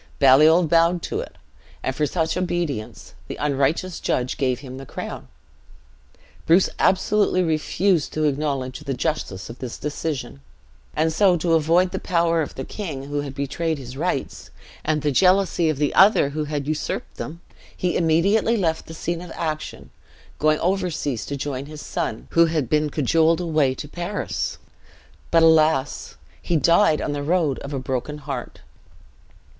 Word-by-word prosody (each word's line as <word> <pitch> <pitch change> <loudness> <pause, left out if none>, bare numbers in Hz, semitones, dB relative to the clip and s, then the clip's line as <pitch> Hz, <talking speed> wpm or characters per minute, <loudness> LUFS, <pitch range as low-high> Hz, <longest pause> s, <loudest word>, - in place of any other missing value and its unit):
Baliol 155 +5 +6
bowed 170 +2 +3
to - - -3
it; - - -7 0.5
and 130 - -2
for 150 +1 +1
such 160 -1 -1
obedience, 175 -10 -3
the - - -5
unrighteous 150 +5 0
judge 125 0 -1
gave 130 -3 -1
him 130 -2 -9
the 135 - -8
crown. - - -7 1.2
Bruce 175 +4 +4
absolutely 190 -1 +2
refused 165 +1 +1
to 155 - -1
acknowledge 140 -3 -1
the 135 - -4
justice 125 - -3
of 115 - -10
this 125 -3 -6
decision; 145 - -4 0.5
and 160 +1 +1
so 185 0 +4
to 165 +1 0
avoid 165 +3 +3
the - - -3
power 170 -1 +1
of 150 - -5
the 135 - -4
king 160 -11 -6
who 145 0 -1
had 140 -2 -7
betrayed 150 +4 -2
his 130 -2 -9
rights, - - -3 0.3
and 155 -1 0
the 150 - +1
jealousy 185 +1 +3
of 155 - -1
the 145 0 0
other 195 -7 +5
who 150 +1 -3
had 145 -1 -3
usurped 155 0 -3
them, 165 +3 -6 0.4
he 180 -1 -1
immediately 195 +8 +2
left 165 -5 -1
the 160 - -9
scene 170 +1 -3
of 180 -2 -9
action, 155 - -5 0.5
going 155 0 +3
over 185 +1 +1
seas, 140 - -3
to 140 - -3
join 140 0 -4
his 155 0 -9
son, - - -4
who 170 0 +5
had 155 -5 -1
been 150 +3 +1
cajoled 160 +4 +2
away 155 -6 +1
to 145 - -7
Paris. 175 +6 -3 0.7
But, 165 -1 +4
alas! 155 -4 +3 0.3
he 175 - -1
died 165 +2 +4
on - - -2
the 145 0 -3
road 155 -2 +1
of 140 - -8
a 140 - -2
broken 130 +3 -3
heart. 135 -4 -6
155 Hz, 165 wpm, -23 LUFS, 140-170 Hz, 1.2 s, Baliol